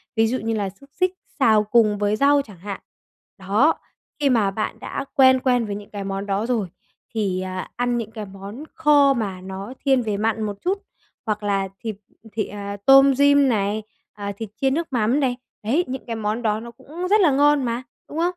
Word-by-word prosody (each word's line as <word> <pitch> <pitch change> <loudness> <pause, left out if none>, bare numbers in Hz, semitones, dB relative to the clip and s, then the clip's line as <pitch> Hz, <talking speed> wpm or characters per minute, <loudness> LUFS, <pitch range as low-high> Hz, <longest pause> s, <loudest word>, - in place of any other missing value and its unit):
Ví 225 0 +3
dụ 255 +3 0
như 225 +1 -2
là 205 -3 -1
xúc 275 +9 -18
xích 365 0 +1 0.3
xào 220 -5 +5
cùng 215 -1 +3
với 205 +1 +1
rau 285 +3 +4
chẳng 210 -8 -13
hạn. 200 +1 -6 0.6
Đó, 205 +11 +2 0.4
khi 285 -2 +3
mà 220 -6 +3
bạn 215 +2 -3
đã 275 - -5
quen 260 -1 +6
quen 250 -3 +2
với 205 - -4
những 205 0 -9
cái 200 -1 -6
món 195 0 -3
đó 200 +2 -1
rồi, 230 -5 0 0.5
thì, 195 -5 -1
à, 185 0 -5
ăn 245 0 0
những 225 -2 -4
cái 215 -2 -6
món 200 +7 -9
kho 290 -3 +5
mà 200 -7 -3
nó 190 +5 -7
thiên 265 -2 +4
về 215 -3 -2
mặn 220 +1 0
một 205 -1 -3
chút, 395 +3 -1 0.4
hoặc 215 -1 -2
là 195 -1 0
thịt 220 -2 -4 0.4
thị, 215 -1 -1
à, 200 0 -6
tôm 270 0 +7
rim 285 -1 +5
này, 210 -1 0 0.3
ờ, 200 -1 -5
thịt 225 -3 -6
chiên 270 -1 +3
nước 330 +3 -1
mắm 235 +4 +2
này. 255 -3 0 0.3
Đấy, 275 +12 +2
những 265 +1 -5
cái 230 -2 -4
món 220 +1 -2
đó 215 -2 0
nó 235 +1 -9
cũng 310 +8 -7
rất 425 0 +5
là 320 -6 +5
ngon 290 +1 +4
mà, 240 +1 -2 0.3
đúng 300 - -7
không? 330 - +1
225 Hz, 215 wpm, -22 LUFS, 205-270 Hz, 0.6 s, tôm